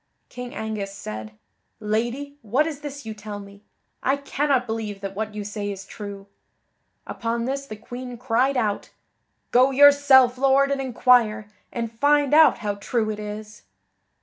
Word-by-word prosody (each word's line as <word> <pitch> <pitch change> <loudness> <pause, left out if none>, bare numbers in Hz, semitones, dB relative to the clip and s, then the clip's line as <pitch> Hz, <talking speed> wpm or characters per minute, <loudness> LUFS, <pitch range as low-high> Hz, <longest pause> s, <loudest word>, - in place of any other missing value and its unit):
King 250 0 -8
Angus 215 -3 -4
said: 110 - -8 0.4
"Lady, 240 +7 -2
what 245 +8 +1
is 310 -3 -4
this 285 -3 -8
you 220 - -5
tell 210 -1 -7
me? 200 0 -13 0.4
I 270 - +2
cannot 280 -2 0
believe 220 -3 -4
that 195 -1 -5
what 215 0 -4
you 210 - -4
say 205 0 -4
is 195 -1 -8
true." 200 -1 -8 0.8
Upon 230 0 -3
this 275 +2 -3
the 215 - -7
Queen 245 +3 -8
cried 255 +2 +1
out: 210 -4 -1 0.6
"Go 255 +2 +5
yourself, 270 -2 +6
Lord, 275 +1 +4
and 275 -1 0
inquire, 235 -4 +2 0.2
and 230 -2 -3
find 285 +3 +3
out 315 0 +7
how 205 - 0
true 220 0 0
it 210 - -6
is." 210 0 -7
235 Hz, 155 wpm, -24 LUFS, 210-270 Hz, 0.8 s, out